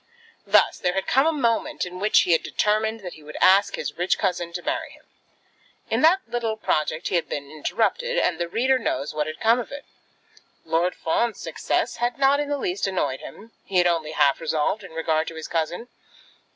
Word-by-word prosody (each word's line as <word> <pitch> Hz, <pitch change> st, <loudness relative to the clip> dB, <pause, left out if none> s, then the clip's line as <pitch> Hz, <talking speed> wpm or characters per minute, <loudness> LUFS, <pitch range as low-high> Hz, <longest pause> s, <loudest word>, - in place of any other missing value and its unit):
Thus -, -, +4 dB
there 180 Hz, -, 0 dB
had 195 Hz, 0 st, -1 dB
come 270 Hz, +4 st, +3 dB
a -, -, +4 dB
moment 235 Hz, -, 0 dB
in 180 Hz, 0 st, -8 dB
which 210 Hz, +2 st, +4 dB
he 180 Hz, -, 0 dB
had 165 Hz, -, +4 dB
determined 220 Hz, +1 st, 0 dB
that 180 Hz, -2 st, -7 dB
he 155 Hz, -, -14 dB
would 150 Hz, +1 st, -10 dB
ask 195 Hz, +2 st, +5 dB
his -, -, -5 dB
rich 180 Hz, +2 st, +1 dB
cousin 175 Hz, -4 st, -1 dB
to 175 Hz, 0 st, -5 dB
marry -, -, -2 dB
him. -, -, -18 dB, 0.9 s
In -, -, +1 dB
that 345 Hz, +5 st, +5 dB
little 230 Hz, -2 st, -2 dB
project 155 Hz, -4 st, -1 dB
he -, -, -5 dB
had 170 Hz, -, -3 dB
been 140 Hz, -1 st, -5 dB
interrupted, 485 Hz, -, -1 dB
and 175 Hz, -, +1 dB
the 170 Hz, -, -1 dB
reader 255 Hz, +7 st, +2 dB
knows 150 Hz, -, -2 dB
what 150 Hz, 0 st, -1 dB
had 155 Hz, 0 st, -6 dB
come 230 Hz, +2 st, +4 dB
of 240 Hz, -, -6 dB
it. 280 Hz, 0 st, -8 dB, 0.8 s
Lord 165 Hz, +3 st, +1 dB
Fawn's 225 Hz, +8 st, -1 dB
success -, -, -2 dB
had 240 Hz, 0 st, -1 dB
not 275 Hz, +1 st, +4 dB
in 290 Hz, -1 st, -2 dB
the 290 Hz, -, 0 dB
least 195 Hz, -6 st, -2 dB
annoyed 145 Hz, -9 st, -1 dB
him. 225 Hz, +3 st, -11 dB
He 190 Hz, -, -2 dB
had 175 Hz, -, +5 dB
only 165 Hz, -3 st, 0 dB
half 140 Hz, 0 st, +3 dB
resolved 165 Hz, +6 st, 0 dB
in 180 Hz, -4 st, -11 dB
regard 160 Hz, -1 st, 0 dB
to 165 Hz, -, -6 dB
his 160 Hz, -1 st, -6 dB
cousin. 170 Hz, +7 st, -2 dB
185 Hz, 210 wpm, -24 LUFS, 160-235 Hz, 0.9 s, ask